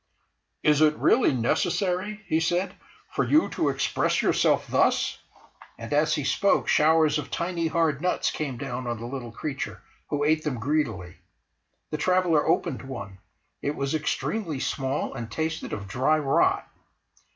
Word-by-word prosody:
"Is 150 0 +4
it 155 -1 +5
really 250 - +3
necessary," 180 - 0
he 160 -3 +1
said, 175 +3 0 0.4
"for - - 0
you 310 +3 +3
to - - 0
express - - 0
yourself - - +2
thus?" - - +1 0.6
And - - -6
as - - +3
he - - -2
spoke 200 - +2
showers 155 0 +4
of 150 - -6
tiny 170 -1 -1
hard 160 -3 +1
nuts 180 +1 0
came 140 -5 -4
down 125 0 -5
on 120 -1 -2
the 115 - -6
little 120 -1 -6
creature, 135 +3 -5 0.3
who 145 0 -1
ate 155 +1 +2
them 135 -6 -2
greedily. 110 - -2 0.7
The 155 - -1
traveller 175 -1 +2
opened 155 -7 +1
one; 100 -8 -8 0.4
it 145 +1 -2
was 140 +1 -2
extremely 155 +1 -2
small 135 +1 -2
and 115 -1 -6
tasted 160 +3 -3
of 100 -1 -5
dry 130 +9 +2
rot. 140 -3 +2
150 Hz, 150 wpm, -26 LUFS, 130-165 Hz, 0.7 s, it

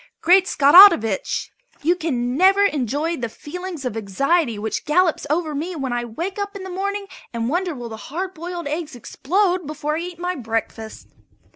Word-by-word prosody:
Great 375 +2 +4
Scottovitch! 280 - +5 0.3
you 340 +4 +3
can 255 -8 -2
never 385 +5 +5
enjoy 300 - -1
the 240 -6 -4
feeling 360 +8 -7
of 245 - -3
anxiety 235 - 0
which 215 +1 -3
gallops 325 0 +1
over 310 0 -1
me 330 +5 -4
when 270 -5 -3
I 240 0 -2
wake 340 - -5 0.2
in 390 - -7
the 380 - -7
morning 400 +2 -3 0.3
and 230 0 -2
wonder 350 +1 -1
will 240 -2 -7
the 220 - -7
hard 370 +6 -4
boiled 345 +1 -6
eggs 305 -1 -4
explode 360 - -1
before 300 0 -3
I - - -3
eat 350 0 -7
my 355 +1 -2
breakfast. 225 -4 -5
315 Hz, 170 wpm, -21 LUFS, 245-360 Hz, 0.3 s, Scottovitch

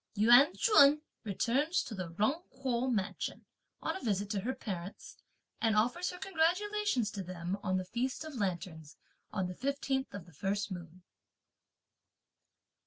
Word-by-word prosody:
Yuan 240 +7 +7
Ch'un 300 - +6 0.2
returns 270 - +1
to - - -7
the 185 -4 -4
Jung 270 +11 +2
Kuo 255 -1 -1
mansion, 205 -5 -2 0.4
on - - -1
a 380 - -6
visit 205 -3 -1
to 205 - 0
her 250 +7 -2
parents, 195 -6 -6 0.5
and 225 -2 +3
offers 245 +12 +2
her 360 - -6
congratulations 365 - +1
to 200 - -5
them 180 0 -4
on 185 -1 0
the 185 - -2
feast 250 - -2
of 310 - -7
lanterns, 175 - -4 0.3
on 190 - -1
the 180 - -4
fifteenth 270 +3 -1
of 195 -4 -7
the 175 - -17
first 200 +6 -2
moon. 175 0 -8
220 Hz, 150 wpm, -33 LUFS, 185-280 Hz, 0.5 s, Yuan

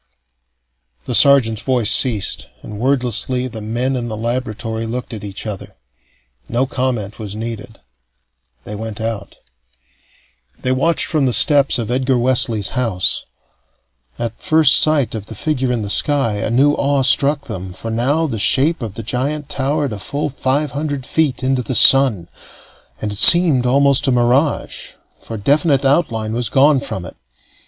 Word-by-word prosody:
The - - -4
sergeant's 120 -4 +3
voice 120 -4 0
ceased, 100 - +1 0.2
and 105 -1 -9
wordlessly 125 0 -1
the 110 -3 -9
men 120 +5 -3
in 120 -2 -4
the 110 -2 -6
laboratory 115 -1 -4
looked 120 +1 -6
at 110 - -8
each 100 +1 -7
other. 105 -3 -8 0.7
No 125 +3 0
comment 125 -6 -4
was 105 -2 -7
needed. 110 0 -8 0.8
They 105 - -9
went 110 0 -7
out. 110 -3 -5 1.3
They 130 - 0
watched 155 +6 +1
from 150 -5 0
the 125 - -1
steps 140 0 +3
of 115 -1 -4
Edgar 130 0 0
Wesley's 120 -5 +2
house. 115 -8 -2 0.9
At 115 -1 -6
first 155 -3 +4
sight 145 -6 +1
of 110 -3 -7
the 110 - -9
figure 130 0 -2
in 120 -3 -2
the - - -5
sky, 115 -1 +2
a 105 - -3
new 135 +5 +2
awe 140 -1 0
struck 140 +2 +3
them, 95 -7 -7
for 115 +5 -8
now 135 +8 0
the 115 -8 -4
shape 140 +9 +2
of 110 -4 -6
the 115 - -6
giant 140 +6 -3
towered 140 -1 -2
a 105 - -7
full 145 +9 -4
five 140 +1 -2
hundred 145 -1 -4
feet 150 -3 -1
into 130 0 0
the 125 +2 -4
sun, 125 -12 +5 0.7
and 105 - -4
it 100 - -3
seemed 155 -8 +7
almost 140 +2 +2
a - - +2
mirage, 125 +5 -1 0.3
for 115 - -8
definite 140 +5 +1
outline 115 -7 0
was 120 -1 -1
gone 140 +2 +3
from 125 -10 -6
it. - - -11
125 Hz, 160 wpm, -17 LUFS, 110-140 Hz, 1.3 s, seemed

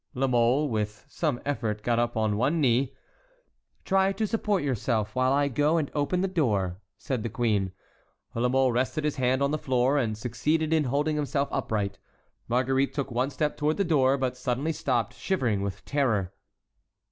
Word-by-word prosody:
La 135 +2 +1
Mole 125 +3 +3
with 105 -3 -3
some 150 -7 -1
effort 110 -7 -2
got 120 -1 +1
up 120 -1 0
on 110 -1 +1
one 135 +10 +1
knee. 130 -1 +2 0.9
"Try 195 0 +3
to 220 - -1
support 210 -4 0
yourself 115 -5 -1
while 130 0 +2
I 140 +1 +3
go 145 +5 +2
and 150 -4 -1
open 150 +5 0
the 190 - +1
door," 105 - 0 0.2
said 130 -1 -3
the 115 - -3
queen. 105 -5 0 0.6
La 120 +2 +1
Mole 130 0 +3
rested 130 +5 -1
his 150 -1 -1
hand 130 +1 +2
on 140 - +1
the 155 - -1
floor 130 +2 +2
and 110 -5 -1
succeeded 150 +8 0
in 155 -2 +3
holding 145 +4 0
himself 145 -1 -1
upright. 105 -6 -2 0.5
Marguerite 130 +3 +1
took 140 -3 -2
one 125 +3 0
step 150 0 -2
toward 150 +1 0
the 200 - +2
door, 140 -6 +3
but 130 -2 -1
suddenly 125 +5 -1
stopped, 120 -6 -1
shivering 120 - -1
with 100 -1 -5
terror. 115 -10 0
130 Hz, 180 wpm, -27 LUFS, 115-150 Hz, 0.9 s, Mole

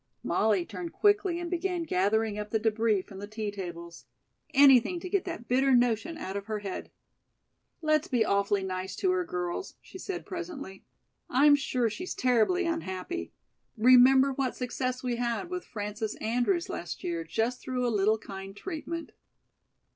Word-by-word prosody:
Molly 205 -5 +2
turned 340 - -7
quickly 410 -4 +2
and 345 - -4
began 355 0 -1
gathering 210 - +1
up 210 0 -5
the 220 - +1
débris 220 -2 +1
from 195 - -11
the 205 - -6
tea 215 -1 -4
tables. 170 -8 -8 0.4
Anything 275 +4 +6
to 365 - -6
get 385 0 0
that 335 -10 -6
bitter 265 +1 +4
notion 245 +7 +1
out 190 -11 -5
of 200 0 -5
her 215 -1 -2
head. 200 -2 -6 0.9
"Let's 310 -1 +2
be 240 -4 +2
awfully 200 -1 +1
nice 185 0 -4
to 375 - +1
her, 365 -1 +1
girls," 180 - -4
she 375 - -12
said 370 -1 -5
presently. 340 - -7 0.5
"I'm 285 +3 +6
sure 255 -4 0
she's 355 - -5
terribly 255 +9 +2
unhappy. 330 - -3 0.5
Remember 255 +3 +6
what 265 -2 -1
success 255 0 -3
we 245 -2 -1
had 240 +9 -2
with 360 0 -3
Frances 210 0 -4
Andrews 245 - 0
last 175 0 -6
year 170 -1 -2
just 225 +9 -1
through 250 -1 -2
a 235 - 0
little 210 +2 +3
kind 195 -1 -9
treatment." 335 - -5
245 Hz, 160 wpm, -29 LUFS, 205-330 Hz, 0.9 s, Anything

